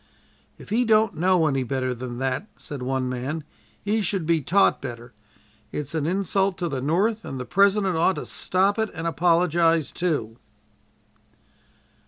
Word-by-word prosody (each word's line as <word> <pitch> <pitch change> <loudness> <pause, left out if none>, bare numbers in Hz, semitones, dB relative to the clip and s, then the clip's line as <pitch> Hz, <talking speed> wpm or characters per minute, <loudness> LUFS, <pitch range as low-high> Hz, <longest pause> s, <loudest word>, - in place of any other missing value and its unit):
"If - - -13
he 235 +3 +3
don't 220 -3 +3
know 180 0 +2
any 135 -3 +1
better 130 0 -2
than 120 0 -6
that," 135 - -2
said 145 -5 -7
one 130 0 -1
man, 130 +5 -3 0.4
"he 215 +2 0
should 195 -3 -1
be 165 -1 +2
taught 195 +8 +3
better. 120 -2 -8 0.6
It's 150 +1 -4
an 155 -2 -1
insult 195 +1 0
to 175 -2 -2
the 135 -5 -3
North 200 - +1
and 135 - -6
the 125 - -4
President 195 +1 +3
ought 170 +3 +2
to - - -5
stop 195 +3 +1
it 220 -1 0
and 165 +1 -5
apologize, 165 -2 +2
too." 145 -11 -2
165 Hz, 160 wpm, -24 LUFS, 135-195 Hz, 0.6 s, he